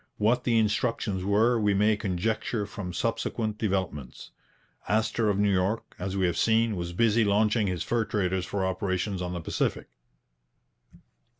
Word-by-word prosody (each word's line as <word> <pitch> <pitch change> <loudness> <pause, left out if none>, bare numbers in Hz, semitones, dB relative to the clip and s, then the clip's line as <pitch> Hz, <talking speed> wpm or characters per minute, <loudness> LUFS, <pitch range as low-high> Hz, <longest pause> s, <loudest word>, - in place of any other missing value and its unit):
What 120 +4 +2
the 115 -2 +3
instructions 105 -3 0
were 110 +5 +3
we 105 -2 +2
may 105 +2 +3
conjecture 105 +2 -2
from 100 -3 -6
subsequent 110 +1 -2
developments. 95 - -3 0.6
Astor 110 +1 +1
of 100 - +1
New 100 -1 +2
York, 95 +4 -1
as 95 +1 -3
we 95 - +2
have 85 -2 0
seen, 115 -1 +2
was 85 -1 -4
busy 115 +4 +3
launching 105 +1 +2
his 90 -3 -2
fur 115 +4 0
traders 95 -4 -1
for 100 -2 -1
operations 95 +1 -2
on 90 0 -3
the 85 - -4
Pacific. - - -2
105 Hz, 155 wpm, -27 LUFS, 95-110 Hz, 0.6 s, the